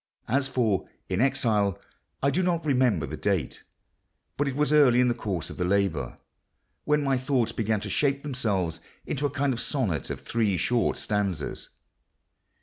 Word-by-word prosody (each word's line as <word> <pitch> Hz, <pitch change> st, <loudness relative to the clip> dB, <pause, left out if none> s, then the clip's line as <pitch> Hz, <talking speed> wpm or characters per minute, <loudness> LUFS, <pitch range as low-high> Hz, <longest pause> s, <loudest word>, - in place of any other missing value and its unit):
As 135 Hz, +3 st, +1 dB
for 115 Hz, -7 st, +1 dB, 0.2 s
In 95 Hz, +3 st, 0 dB
Exile, 105 Hz, -7 st, +2 dB, 0.4 s
I 140 Hz, -, +4 dB
do 180 Hz, -, +1 dB
not 175 Hz, -3 st, 0 dB
remember 125 Hz, -, +2 dB
the -, -, -6 dB
date—but 145 Hz, -, -5 dB
it 135 Hz, -, -2 dB
was 150 Hz, +1 st, +1 dB
early 135 Hz, -5 st, +6 dB
in 125 Hz, 0 st, +4 dB
the -, -, +2 dB
course 100 Hz, -8 st, -4 dB
of -, -, -9 dB
the 90 Hz, -, 0 dB
labour—when 100 Hz, -, -2 dB
my 135 Hz, -2 st, +1 dB
thoughts 125 Hz, -3 st, +1 dB
began 110 Hz, -1 st, 0 dB
to -, -, -5 dB
shape 140 Hz, -1 st, +1 dB
themselves 105 Hz, -, -1 dB, 0.3 s
into 145 Hz, 0 st, -1 dB
a -, -, -5 dB
kind 140 Hz, 0 st, 0 dB
of 120 Hz, -, -2 dB
sonnet 115 Hz, -, -1 dB
of -, -, -4 dB
three 110 Hz, -5 st, 0 dB
short 120 Hz, +8 st, +1 dB
stanzas. 100 Hz, -8 st, -2 dB
120 Hz, 160 wpm, -27 LUFS, 100-140 Hz, 0.4 s, early